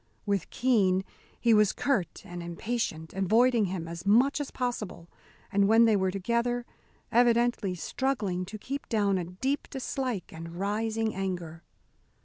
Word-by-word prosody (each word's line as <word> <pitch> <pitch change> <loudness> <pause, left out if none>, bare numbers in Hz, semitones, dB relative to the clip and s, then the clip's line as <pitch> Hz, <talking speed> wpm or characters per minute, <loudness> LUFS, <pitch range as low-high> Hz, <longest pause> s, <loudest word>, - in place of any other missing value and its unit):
With 200 -3 -1
Keene 200 -7 +2 0.4
he 235 -1 +4
was 210 -2 +4
curt 250 -10 -1
and 175 0 -7
impatient, 170 -2 -3
avoiding 225 +4 +3
him 180 -3 -4
as 170 0 -7
much 245 +9 +4
as 285 - -4
possible, 210 -9 -4 0.4
and 200 -1 +3
when 225 +2 +6
they 220 -2 +4
were 190 -1 +2
together, 235 +5 -1 0.5
evidently 235 -5 +3
struggling 200 - -1
to 205 +4 -7
keep 275 +6 -6
down 200 -4 +2
a 175 - -3
deep 260 +12 -2
dislike 255 - -3
and 165 +1 -8
rising 220 +3 -1
anger. 175 -4 -4
210 Hz, 140 wpm, -29 LUFS, 185-240 Hz, 0.5 s, when